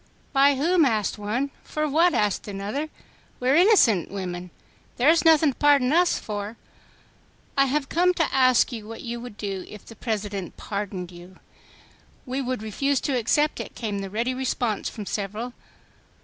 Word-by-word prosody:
"By 280 +1 +5
whom?" 330 +5 +3
asked 220 -6 0
one. 240 +7 -2
"For 305 0 -2
what?" 330 +5 +3
asked 210 -1 0
another. 205 +10 -4 0.5
"We 250 - 0
are 270 - +5
innocent 335 - +5
women. 180 -2 -5 0.5
There 255 +5 +4
is 330 0 +4
nothing 315 -3 +5
to - - -30
pardon 285 -2 +4
us 350 +1 +3
for." 210 +1 -5 1.0
"I 275 - +4
have 275 +1 -1
come 355 +4 +3
to 325 - 0
ask 255 -1 +4
you 220 -3 -7
what 225 0 -8
you 235 0 -4
would 235 -3 -9
do 195 -3 -4
if 210 - -11
the 225 - -12
President 205 -5 -4
pardoned 200 -3 -5
you." 175 +1 -13 0.9
"We 260 +1 -2
would 255 -4 -3
refuse 275 +6 0
to 275 - -1
accept 295 +6 +1
it," - - -7
came 210 -4 -3
the 195 0 -5
ready 230 +5 -1
response 250 -4 -1
from 210 -3 -8
several. 215 +5 -4
240 Hz, 170 wpm, -25 LUFS, 205-280 Hz, 1.0 s, By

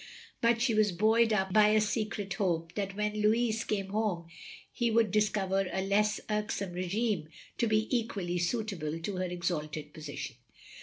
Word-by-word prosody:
But 235 0 +3
she 240 -2 +2
was 215 -2 +3
buoyed 220 +5 +3
up 190 -3 +1
by 215 -1 +7
a 215 +1 +4
secret 210 -2 -1
hope 170 -4 -1
that 195 -1 -3
when 210 0 -1
Louis 225 +1 +2
came 195 -2 -2
home 205 -5 -1 0.5
he 240 -1 0
would 225 -2 +3
discover 195 -2 +1
a 190 - -1
less 205 +1 +2
irksome 210 -3 -2
r6gime 185 -1 -1 0.3
to 235 - +3
be 215 0 +2
equally 195 -7 -1
suitable 175 -5 -2
to 185 +3 -4
her 185 - 0
exalted 155 -4 -3
position. 150 -6 -7
205 Hz, 160 wpm, -31 LUFS, 180-215 Hz, 0.5 s, by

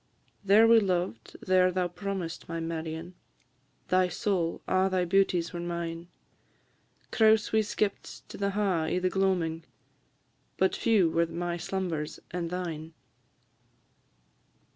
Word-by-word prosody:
There 205 +3 +6
we 230 0 +7
loved, 180 - -2
there 185 -1 +4
thou 180 0 0
promised, 180 -2 -5
my 165 0 -3
Marion, 165 +1 -5 0.8
Thy 185 0 +3
soul 175 -1 -1
a' 185 +1 +2
thy 185 -1 +1
beauties 180 -2 +1
were 175 - -4
mine; 170 -1 -4 1.0
Crouse 220 -1 +4
we 220 - +4
skipt 210 -1 -3
to - - -9
the 200 0 -1
ha' 195 -5 +1
i' - - 0
the 185 0 0
gloamin', 180 -4 0 1.0
But 190 - +2
few 205 -8 +3
were 170 +1 +2
my 170 +1 -3
slumbers 170 -3 -3
and 170 -1 -3
thine. 165 -3 -5
180 Hz, 125 wpm, -28 LUFS, 165-195 Hz, 1.0 s, we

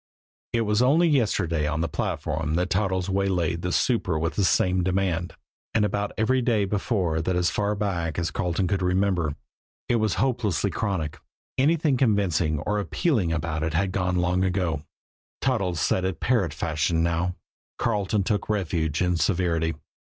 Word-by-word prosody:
It 115 - +1
was 105 0 +1
only 155 +7 +4
yesterday 85 - +1
on 75 +1 -1
the 85 - 0
platform 80 0 -2
that 90 +2 0
Toddles 95 -2 +1
had 95 - -3
waylaid 90 -4 0
the 90 - -2
super 95 -7 +1
with 80 +1 -1
the 100 - 0
same 90 0 +3
demand 90 -2 -1 0.4
and 105 -2 +4
about 100 0 -1
every 130 +4 +2
day 115 -4 +2
before 95 -5 0
that 90 +3 -1
as 90 0 +2
far 105 0 0
back 90 -6 -2
as 85 -1 -1
Carleton 90 0 -1
could 95 0 0
remember. 90 -4 +1 0.5
It 120 - +2
was 110 -3 +1
hopelessly 110 -7 0
chronic. 90 -6 -2 0.4
Anything 150 -1 +3
convincing 95 - +2
or 105 +6 -1
appealing 105 - 0
about 80 -1 -2
it 80 0 -1
had 95 +2 +1
gone 90 -1 0
long 90 +1 +1
ago 90 -5 0 0.6
Toddles 100 -10 0
said 95 - +1
it 95 -2 -2
parrot 115 - +1
fashion 80 +1 0
now. 85 +1 0 0.4
Carleton 105 -3 0
took 105 +1 -1
refuge 85 -6 0
in 90 -1 +1
severity. 85 -3 +1
95 Hz, 165 wpm, -25 LUFS, 85-105 Hz, 0.6 s, only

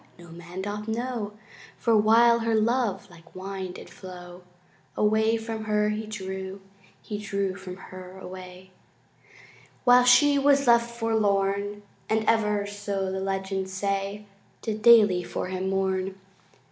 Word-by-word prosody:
(no 175 -1 -14
man 175 +3 -8
doth 210 +1 -5
know) 225 -2 -3 0.4
For 230 -2 +2
while 230 +2 +5
her 225 -1 0
love 230 -1 +1
like 165 0 -18
wine 190 -1 -5
did - - -10
flow 180 -1 -11 0.6
Away 220 +2 +3
from 225 -1 -5
her 210 0 +1
he 215 +1 -3
drew 190 -2 -6 0.4
He 210 -1 -5
drew 200 -2 -2
from 185 -1 -8
her 185 0 -11
away, 185 0 -10 1.1
While 245 0 +6
she 285 +3 +6
was 280 0 +4
left 235 -1 +4
forlorn 205 -3 0 0.3
And 220 0 +1
ever 210 -2 +2
(so 200 -2 -3
the 190 - -3
legends 190 0 -3
say) 195 +1 -2 0.4
Did 215 -1 -3
daily 210 -6 +6
for 180 - -4
him 185 0 -2
mourn. 190 0 -1
205 Hz, 135 wpm, -26 LUFS, 190-220 Hz, 1.1 s, While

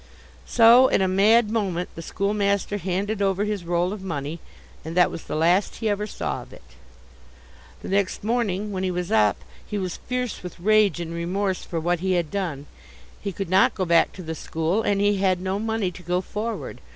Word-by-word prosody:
So, 240 +2 +7
in - - +2
a - - +2
mad 210 +4 +4
moment, 190 -6 -1
the 165 - -8
schoolmaster 200 +2 0
handed 195 +3 -2
over 195 0 +1
his 210 -3 -3
roll 175 +2 0
of 210 - -7
money, 160 -3 -4 0.4
and 165 +2 -6
that 180 - +5
was 165 - -8
the - - -4
last 175 +5 +2
he 225 - -2
ever 205 +1 -1
saw - - -4
of - - -14
it. - - -14 1.2
The - - -6
next 195 0 0
morning 210 -3 -1
when 190 -2 -3
he 190 - 0
was 180 -1 -3
up 105 -2 +3 0.3
he 210 - -5
was 185 -3 -3
fierce 250 -2 -3
with 180 -2 -9
rage 210 0 +3
and 165 -1 -5
remorse 185 +3 -2
for 165 - -4
what 175 +1 0
he 190 +1 0
had 170 -4 0
done. 170 -8 -3 0.6
He 200 - -3
could 195 +1 -4
not 190 +1 +4
go 185 - -1
back 170 -1 +4
to 185 - -9
the 160 0 -4
school, 165 +5 -1
and 200 -2 +1
he 205 0 +2
had 190 -2 +2
no 190 +2 -2
money 220 -3 -1
to 180 - -12
go 180 +1 0
forward. 215 +4 -5
190 Hz, 205 wpm, -24 LUFS, 175-205 Hz, 1.2 s, So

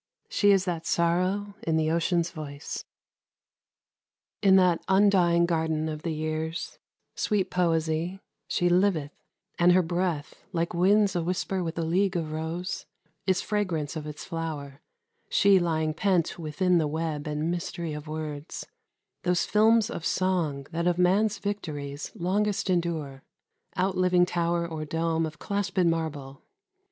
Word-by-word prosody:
She 205 - +3
is 195 -2 +4
that 170 -3 -3
sorrow 185 +4 +1
in 160 -1 0
the 155 0 +1
ocean's 170 +1 +1
voice. 145 -2 -6 1.6
In 195 -2 +6
that 180 -3 +4
undying 190 -3 +4
garden 160 -2 0
of 155 -1 -4
the 170 - -3
years, 155 +1 -3 0.3
Sweet 205 -4 0
poesy, 165 +1 0 0.3
she 175 - +1
liveth, 175 -5 +2 0.5
and 175 +1 +6
her 185 0 +4
breath, 170 -3 -1 0.2
Like 170 0 -1
winds 195 +3 +3
a 175 - +1
whisper 180 +2 -1
with 165 0 -4
a 165 - 0
league 185 +4 +1
of 160 -3 -2
rose, 160 +3 -4 0.4
Is 185 0 +2
fragrance 175 -8 -1
of 155 -1 -5
its 150 0 -7
flower, 155 -5 -5 0.5
she 200 -2 +5
lying 160 -3 0
pent 180 0 +1
Within 170 +3 +1
the 155 - +1
web 155 -1 -3
and 150 +2 -1
mystery 170 -2 -3
of 150 +1 -7
words, 155 -1 -5 0.6
Those 180 0 +1
films 220 +1 +4
of 170 - -5
song 165 -7 0
that 170 +1 -1
of 175 -1 +2
man's 200 +4 +3
victories 150 -9 -4
Longest 200 +2 0
endure, 160 -6 -1 0.6
outliving 185 -1 +3
tower 170 -1 0
or 160 -2 -5
dome 165 +1 0
Of 160 +1 -10
clasped 200 -2 -1
marble. 155 -5 -2
170 Hz, 140 wpm, -27 LUFS, 155-185 Hz, 1.6 s, In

